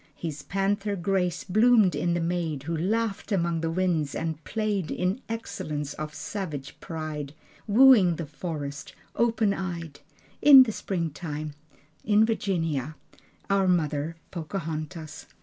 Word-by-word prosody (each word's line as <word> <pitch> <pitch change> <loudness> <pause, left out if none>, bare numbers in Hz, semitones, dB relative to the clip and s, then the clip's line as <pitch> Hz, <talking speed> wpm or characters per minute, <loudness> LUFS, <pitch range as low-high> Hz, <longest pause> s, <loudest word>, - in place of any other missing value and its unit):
His 155 -3 -5
panther 200 +2 -1
grace 180 -2 0
bloomed 215 0 +4
in 175 0 0
the - - 0
maid 165 -4 -2
Who 165 +3 -2
laughed 215 +6 -1
among 170 -4 +1
the 165 - -1
winds 165 -4 0
and 160 -1 -3
played 210 -6 -1
In 185 +7 -1
excellence 150 -10 -4
of 150 -1 -6
savage 150 -4 -5
pride, 155 -3 -5 0.3
Wooing 215 -6 +6
the 165 - -4
forest, 150 -2 -6 0.2
open 225 -3 +2
eyed, 170 -6 -5 0.4
In 275 -2 +10
the 235 - -3
springtime, 155 -6 -4 0.5
In 215 0 +4
Virginia, 165 - -1 0.5
Our 195 -1 +2
Mother, 155 -3 0 0.2
Pocahontas. 160 -2 -5
170 Hz, 125 wpm, -27 LUFS, 155-200 Hz, 0.5 s, In